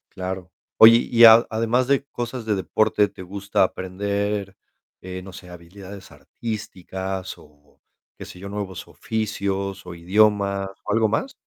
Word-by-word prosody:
Claro. 95 -1 -5 0.3
Oye, 115 +1 +9
y 120 0 +2
a 115 +1 +8
además, 115 +3 0
de 140 0 +2
cosas 120 -3 -6
de 110 -2 0
deporte, 105 +2 +1
¿te - - -13
gusta 100 +2 -1
aprender, 100 +2 -3 0.5
eh, 95 0 -7
no 95 0 -11
sé, 90 -1 -12
habilidades 95 +3 -12
artísticas, 95 -4 -6
o 75 -1 -22 0.4
qué - - -9
sé 90 - -12
yo, 100 +2 -8
nuevos 100 -3 -6
oficios, 100 -3 -4
o 90 - -8
idiomas, 100 +2 +1 0.2
o - - -3
algo 110 0 +3
más? 260 - -2
100 Hz, 145 wpm, -22 LUFS, 95-110 Hz, 0.5 s, Oye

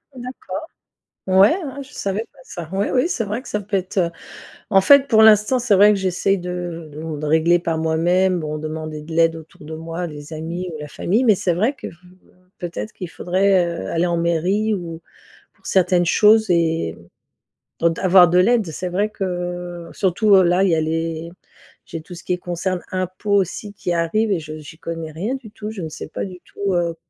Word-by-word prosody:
D'accord. 255 +5 -7 0.6
Ouais, 190 +2 +6
hein, 280 -2 -6
je 280 +2 -15
savais 200 +3 -3
pas - - -26
ça. 170 -2 -8
Oui, 195 +1 0
oui, 255 +3 +2
c'est 245 -10 -1
vrai 210 +5 -4
que - - -12
ça 210 - -2
peut 200 0 -2
être, 190 +1 -3
heu 170 -2 +2 0.6
en 195 -2 +6
fait 280 +7 +6
pour 220 -5 +5
l'instant, 220 +3 +5
c'est 230 -4 +3
vrai 205 +2 +7
que 205 - 0
j'essaie 190 +1 +1
de 175 -3 -5
de 155 0 -6
de 150 - -3
régler 160 +3 +3
par 165 -2 -2
moi-même. 175 +3 +2
Bon, 155 -1 -4
demander 155 0 -5
de 160 +2 -10
l'aide 165 0 +3
autour 160 -1 -13
de 160 +1 -7
moi, 165 +2 -5
les 150 0 -10
amis 165 +4 -4
ou - - -6
la 150 0 -7
famille, 205 - 0
mais 220 -6 +4
c'est 180 -1 0
vrai 215 +10 +1
que - - -9
v - - -8 0.3
heu, - - -26 0.2
peut-être 175 +5 -5
qu'il 180 - -7
faudrait, 185 +2 +2 0.2
heu, - - -6
aller 170 +1 +1
en 170 -1 0
mairie, 175 +6 +1
ou 170 -4 -6 0.5
pour - - -32
certaines 180 -1 +2
choses, 215 +5 +5
et 165 - +1 0.9
d 170 - +4
avoir 185 -1 +7
de 180 +1 +4
l'aide. 230 +3 +3
C'est 180 +4 -4
vrai 200 +4 0
que 175 -3 -4
surtout, 200 +1 +3
heu, 190 - +6
là 180 +2 +3
il 195 - +3
y - - +4
a 160 - +1
les 165 +1 -2 0.6
j'ai 165 - -7
tout 175 +3 -11
ce 175 - -11
qui 180 - -1
est - - -1
concerne 180 +1 -3
impôts 185 +2 -2
aussi 200 +2 -1
qui 180 -3 -3
arrive 190 +6 +1
et 190 - +1
je 155 0 -8
j'y 155 +1 -12
connais 165 -2 -5
rien 195 - -3
du 245 -6 -10
tout. 210 0 -7
Je 215 -4 -7
ne 160 - -4
sais - - -8
pas - - -4
du 185 -2 -9
tout, 200 -1 -3
heu, 170 -1 0
180 Hz, 215 wpm, -21 LUFS, 165-200 Hz, 0.9 s, vrai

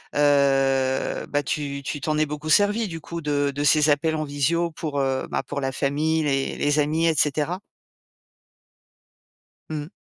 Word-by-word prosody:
heu, 135 -2 +2
bah, 145 0 -1
tu 140 0 -3
tu 145 - -4
t'en 155 +2 -1
es 155 - +3
beaucoup 150 +1 -6
servi, 210 +4 +3
du 165 -2 -7
coup, 170 +2 -6
de 145 -2 0
de 145 +1 -2
ces 150 +1 +4
appels 150 +2 +2
en 155 - -1
visio 155 +4 0
pour, 150 -3 -4
heu, 135 -1 -1
bah, - - -2
pour - - -5
la 135 -1 -2
famille, 155 +4 0
les 135 -2 0
les 145 +1 +1
amis 155 +3 +1
et 165 - +3
cetera? 150 +5 0 2.1
Mmh. 150 -1 -4
145 Hz, 170 wpm, -24 LUFS, 140-155 Hz, 2.1 s, ces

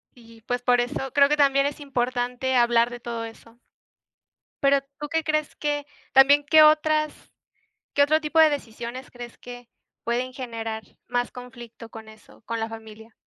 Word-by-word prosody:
Sí, 230 -2 -17
pues, 245 0 -2
por 245 -1 +3
eso 265 +1 -3
creo 280 -1 +5
que 300 - +2
también 275 -1 +3
es 290 +1 -4
importante 250 -1 -2
hablar 235 -1 +4
de 240 0 -8
todo 235 -1 -5
eso. 230 +1 -13 1.0
Pero 275 0 +4 0.2
¿tú 295 0 -5
qué 320 +1 0
crees 305 -1 -1
que? 290 -1 -2 0.3
También, 280 +2 +6
¿qué 310 +1 +6
otras? 305 0 +4 0.8
¿Qué 285 - +4
otro 310 +2 +2
tipo 305 +1 0
de 315 -1 +7
decisiones 245 -2 -6
crees 240 -1 -10
que 245 -1 -11 0.3
pueden 250 +2 -2
generar 225 -3 -5 0.2
más 245 0 -1
conflicto 240 -2 -11
con 220 -1 -11
eso, 215 0 -18
con 230 0 -3
la 225 0 -3
familia? 220 0 -12
245 Hz, 165 wpm, -24 LUFS, 235-285 Hz, 1.0 s, de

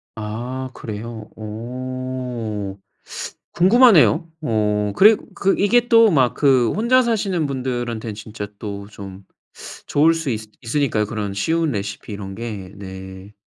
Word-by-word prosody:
아 120 +5 -5
그래요? 110 0 -7
어 120 -2 -5 0.8
궁금하네요. 180 - +5
어 105 -5 0
그리 215 +2 +7 0.2
그 195 0 +2
이게 235 +4 +3
또 230 -2 +7
막 130 -7 +3
그 130 -5 +3
혼자 235 +5 +4
사시는 200 -9 0
분들한텐 120 -4 -3
진짜 105 -1 -7
또 100 -1 -6
좀 100 -2 -10 0.6
좋을 155 +3 +4
수 165 -3 -3
있 110 -3 -1 0.2
있으니까요. 115 -3 0
그런 105 -2 -4
쉬운 160 +9 0
레시피 100 0 -5
이런 95 -1 -6
게. 105 -5 -6
네. 95 0 -9
120 Hz, 230 characters per minute, -21 LUFS, 105-155 Hz, 0.8 s, 그리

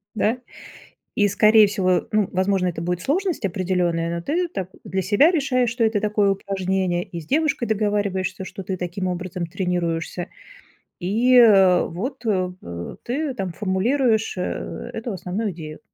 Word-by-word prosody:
Да? 220 +3 +1 0.8
И 205 -1 +4
скорее 215 +2 +6
всего, 185 -3 +1
ну 210 -2 +2
возможно, 190 0 +1
это 170 -2 -4
будет 180 +1 -2
сложность 350 - -1
определённая, 175 -2 0
но 170 - -4
ты 345 - 0
так 190 - -5
для 190 0 -2
себя 205 - +4
решаешь, 255 -6 +1
что 235 -1 0
это 220 -2 +1
такое 210 -1 +2
упражнение 190 -2 -1
и 170 - -7
с 155 - -13
девушкой 295 - +1
договариваешься, 200 -3 -1
что 195 - -8
ты 185 +1 -3
таким 180 +2 -3
образом 180 -1 -4
тренируешься, 175 -1 -2 0.7
и, 225 +8 +2
э, 195 -6 +6
вот, 240 - -5
э, 185 -4 +1
э, 85 0 -7
ты 275 +2 -2
там 190 -6 -4
формулируешь 220 - +1
э 180 - -4
эту 225 0 -4
основную 195 +4 -3
идею. 155 -2 -9
195 Hz, 155 wpm, -22 LUFS, 180-225 Hz, 0.8 s, скорее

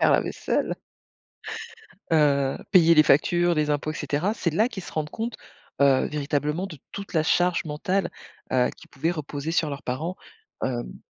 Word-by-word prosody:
faire - - +5
la - - +5
vaisselle. - - -1 1.4
Heu, 140 -4 +3
payer 170 -3 +7
les 155 - +8
factures, 175 +4 +3
les 150 -1 +1
impôts 150 +1 0
et - - -10
cetera. 175 +9 -1
C'est 175 - -1
là 215 +9 +3
qu'ils 200 -6 -7
se - - -10
rendent 150 -1 -2
compte, 230 +4 -4 0.5
heu, 135 -2 +5
véritablement 150 +4 -1
de 160 -6 -10
toute 200 -2 -7
la 160 - +4
charge 175 +2 +2
mentale, 175 +5 -1 0.4
heu, 125 -1 +3
qui - - -15
pouvait 155 +4 -1
reposer 155 -2 -4
sur 160 -3 +1
leurs 140 0 -6
parents, 160 +9 -3 0.5
hem - - -3
155 Hz, 175 wpm, -25 LUFS, 145-175 Hz, 1.4 s, les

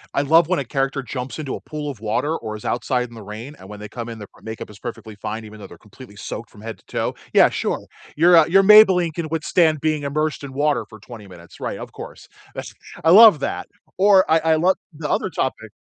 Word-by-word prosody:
I 140 - +2
love 160 +3 +4
when 185 - 0
a 140 - -3
character 135 +2 -2
jumps 125 0 -6
into 150 -4 -5
a - - -9
pool 150 -1 -6
of 125 - -12
water, 125 +8 -1
or 110 -8 -6
is 105 - -11
outside 125 0 -1
in - - -16
the 110 - -10
rain, 110 +8 -9
and 95 - -13
when 105 0 -9
they 105 - -8
come 120 +2 -7
in, 115 - -7
their 105 -2 -10
makeup 110 -1 -8
is 105 - -15
perfectly 115 -3 -8
fine 110 +2 -6
even 110 0 -12
though - - -10
they're - - -14
completely 105 +1 -15
soaked 110 +3 -7
from 105 - -16
head 115 0 -8
to - - -28
toe. - - -3 0.2
Yeah, - - +6
sure. - - -3 0.3
Your, 175 +3 +5
uh 165 -2 +7
your 195 +3 +4
Maybelline 190 -5 +6
can 165 0 -4
withstand 160 0 +1
being 155 0 -1
immersed 150 +2 -2
in 140 - -7
water 145 +1 0
for 110 - -13
20 110 -1 -12
minutes. 85 -2 -15
Right, - - -4
of - - -9
course. - - -11 0.3
That's - - -7 0.3
I 160 - +4
love 205 -6 +8
that, - - -3 0.3
or 195 -1 +5
I 160 - +4
I 160 0 +2
love 180 +4 +2 0.2
the 150 0 -6
other - - 0
topic. 130 -8 -3
140 Hz, 245 wpm, -21 LUFS, 110-160 Hz, 0.3 s, love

